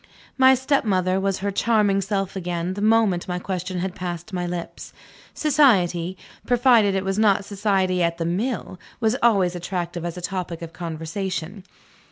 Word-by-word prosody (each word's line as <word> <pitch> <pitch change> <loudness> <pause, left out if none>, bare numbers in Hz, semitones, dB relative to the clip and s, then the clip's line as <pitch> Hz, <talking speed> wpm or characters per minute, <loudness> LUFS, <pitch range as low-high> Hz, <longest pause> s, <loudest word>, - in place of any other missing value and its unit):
My 265 0 +6
stepmother 200 -9 +1
was 195 0 0
her 200 - 0
charming 205 -1 +2
self 195 0 -2
again 175 -1 -3
the 200 - -5
moment 215 -5 +2
my 180 -1 -2
question 180 0 -4
had 190 0 -3
passed 175 +2 -6
my 180 -1 -2
lips. 175 -1 -6 0.4
Society 190 - +2 0.3
provided 240 -5 +4
it 190 0 -1
was 195 +2 -1
not 205 -2 +3
society 195 -3 0
at 170 0 +1
the 165 - -2
mill 190 +2 -2 0.2
was 225 0 +1
always 195 -7 +3
attractive 175 -1 -4
as 175 0 -4
a - - -4
topic 175 -2 -4
of 165 0 -8
conversation. 175 +3 -5
190 Hz, 160 wpm, -23 LUFS, 175-210 Hz, 0.4 s, My